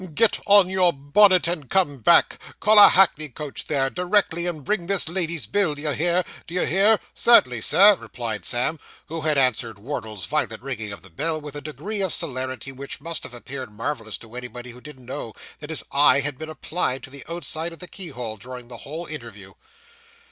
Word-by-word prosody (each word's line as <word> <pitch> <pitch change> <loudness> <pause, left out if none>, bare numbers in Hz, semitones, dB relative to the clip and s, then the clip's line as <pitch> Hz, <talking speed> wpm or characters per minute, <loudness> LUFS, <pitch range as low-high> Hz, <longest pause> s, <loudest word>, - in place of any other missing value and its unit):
Get 225 +5 +3
on 200 -2 +7
your 185 -2 +3
bonnet 180 +7 +4
and 165 -6 -2
come 175 -8 +1
back. 170 +9 +4 0.2
Call 215 0 +6
a 205 - +10
hackney 160 -5 +3
coach 145 +2 -7
there, 135 -3 +1
directly, 180 -2 0
and 160 -5 -4
bring 200 -5 -1
this 195 -3 +3
lady's 170 -2 -2
bill, 195 -7 0
d'ye 145 0 -2
hear 175 +6 +1 0.2
d'ye 175 +2 -1
hear?' 200 +5 +4
Cert'nly, 125 - +4
Sir,' 200 - +7
replied 115 -3 -6
Sam, 125 +6 0 0.3
who 165 +1 -4
had 155 -1 +1
answered 125 -4 +1
Wardle's 110 - -6
violent - - -2
ringing 110 -6 -5
of 100 - -10
the 95 - -15
bell 155 - -2
with 150 -1 -9
a 145 - -5
degree 160 - -5
of 190 -4 0
celerity 130 -3 -2
which 135 +1 -7
must 165 +2 -4
have 125 - -10
appeared 130 -1 -7
marvellous 115 0 -4
to 115 0 -14
anybody 125 0 -8
who 125 +1 -14
didn't 135 -4 -13
know 130 -3 -6 0.3
that 150 - -9
his 160 - +1
eye 140 0 +5
had 145 -2 -4
been 155 0 -6
applied 155 -3 -3
to 135 - -9
the 140 0 -10
outside 170 -1 -3
of 165 - -11
the 180 - -9
keyhole 125 - -7
during 125 +2 -10
the 120 - -9
whole 155 +7 -7
interview. 115 - -9
150 Hz, 195 wpm, -23 LUFS, 125-175 Hz, 0.3 s, a